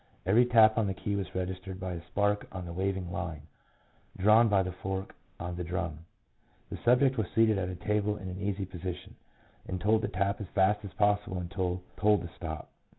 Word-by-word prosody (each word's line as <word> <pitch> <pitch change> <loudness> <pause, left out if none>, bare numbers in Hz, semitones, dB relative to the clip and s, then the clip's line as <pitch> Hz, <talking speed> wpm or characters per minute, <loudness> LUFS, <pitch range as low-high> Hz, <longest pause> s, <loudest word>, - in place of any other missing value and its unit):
Every 115 +7 +5
tap 110 -2 +6
on 110 - +1
the 95 - -2
key 100 +2 -2
was 95 -2 -4
registered 95 0 -4
by 95 -1 -3
a 85 - -5
spark 105 0 0
on 90 -2 -6
the 85 - -6
waving 95 -1 -2
line, 85 -5 -4 0.7
drawn 110 +4 +6
by 100 -2 +4
the 90 - -3
fork 95 +1 -4 0.3
on 85 +1 -4
the 90 - -2
drum. 85 -3 -3 0.7
The - - -4
subject 125 +1 +3
was 105 - 0
seated 110 -3 +4
at 90 -1 -2
a 90 - -4
table 105 +1 0
in 100 -3 -7
an 90 +1 -6
easy 100 -1 -1
position, 90 -1 -7 0.5
and 95 - -3
told 110 +4 +3
to - - -1
tap 100 +2 -1
as 100 - -5
fast 100 +2 +3
as 100 - -8
possible 105 -2 +1
until 90 0 -2
told 105 -1 +3
to 85 - -6
stop. 80 -3 -6
95 Hz, 205 wpm, -30 LUFS, 90-105 Hz, 0.7 s, tap